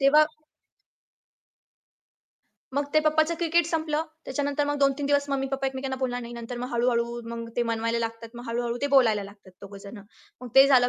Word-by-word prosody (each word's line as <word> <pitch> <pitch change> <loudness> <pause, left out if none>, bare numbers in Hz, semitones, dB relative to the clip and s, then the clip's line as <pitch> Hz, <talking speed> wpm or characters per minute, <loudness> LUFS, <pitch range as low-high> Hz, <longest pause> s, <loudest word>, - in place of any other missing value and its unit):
तेव्हा 300 +3 +6 2.5
मग 285 - +2
ते 310 - +6
पप्पाचं 310 +2 +2
क्रिकेट 340 0 +3
संपलं, 315 -2 0 0.2
त्याच्यानंतर 285 +2 -1
मग 290 - -1
2-3 275 +1 +2
दिवस 285 0 +2
मम्मी 270 -1 0
पप्पा 270 0 0
एकमेकांना 265 0 -3
बोलणार 245 -1 -1
नाही. 235 0 -8
नंतर 235 +1 -6
मग 250 - -5
हळू-हळू 235 0 +1
मग 230 0 -5
ते 240 - +3
मनवायला 230 +1 0
लागतात. 230 0 -4
मग 240 0 -8
हळू-हळू 235 0 -1
ते - - +3
बोलायला 220 -6 +4
लागतात 200 -2 -18
दोघं 200 0 -10
जण. 205 +2 -9 0.4
मग 250 - -7
ते 270 +1 +9
झालं 250 -3 +5
260 Hz, 175 wpm, -26 LUFS, 235-285 Hz, 2.5 s, ते